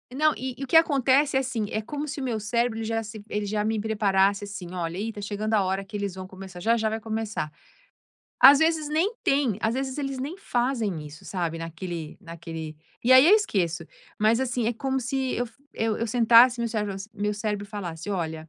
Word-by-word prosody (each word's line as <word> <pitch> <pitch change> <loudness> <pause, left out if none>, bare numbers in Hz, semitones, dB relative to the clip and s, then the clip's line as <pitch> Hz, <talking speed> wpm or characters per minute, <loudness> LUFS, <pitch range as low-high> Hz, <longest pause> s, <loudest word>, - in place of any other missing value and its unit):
Não. 305 +2 +3
E 255 +2 -5
e 275 - -6
o - - -5
que 290 - 0
acontece 275 -3 +4
é, - - +4
assim. 245 -5 -2
É 215 - -1
como 290 +7 -5
se 300 0 -5
o - - -4
meu 235 -4 -1
cérebro 235 +2 0
ele 225 - -3
já 225 0 -1
se 215 -1 -9
ele 210 0 -2
já 210 +1 -1
me 220 0 0
preparasse, 200 -2 +2
assim: 195 -3 -7
"Olha, 170 -1 -3
ih, 220 +3 -3
tá 205 - -8
chegando 210 +2 -3
a 210 -2 +4
hora 190 +1 -1
que 200 - -10
eles 200 -2 -3
vão 185 0 -7
começar 190 -1 -10
já, 225 +6 +2
já 220 -1 0
vai 220 +1 -3
começar." 220 -7 -3 0.9
Às 275 +2 +10
vezes 320 -1 +2
nem 330 +9 +1
tem, 275 -8 +1
Às 220 +1 0
vezes 265 +1 -3
eles 275 -2 -3
nem 280 +6 -4
fazem 230 - -1
isso, 150 +1 -12
sabe, 170 -3 -3
naquele 165 -1 -6
naquele 165 -3 -8 0.3
e 255 - +6
aí 260 +3 +9
eu 390 - +8
esqueço. 175 - 0 0.3
Mas, 220 +3 +3
assim, 245 -3 -1
é 235 - +1
como 265 +3 -2
se 260 +1 -2
eu 245 - -1 0.3
eu 225 -1 -1
eu 230 - -2
sentasse, 240 +2 +6
meu 235 - 0
cérebro 210 -3 -2
f 195 +2 -8
meu 210 0 -1
cérebro 210 -1 -3
falasse: 195 -3 -6
"Olha, 160 -4 -3
220 Hz, 225 wpm, -26 LUFS, 195-255 Hz, 0.9 s, Às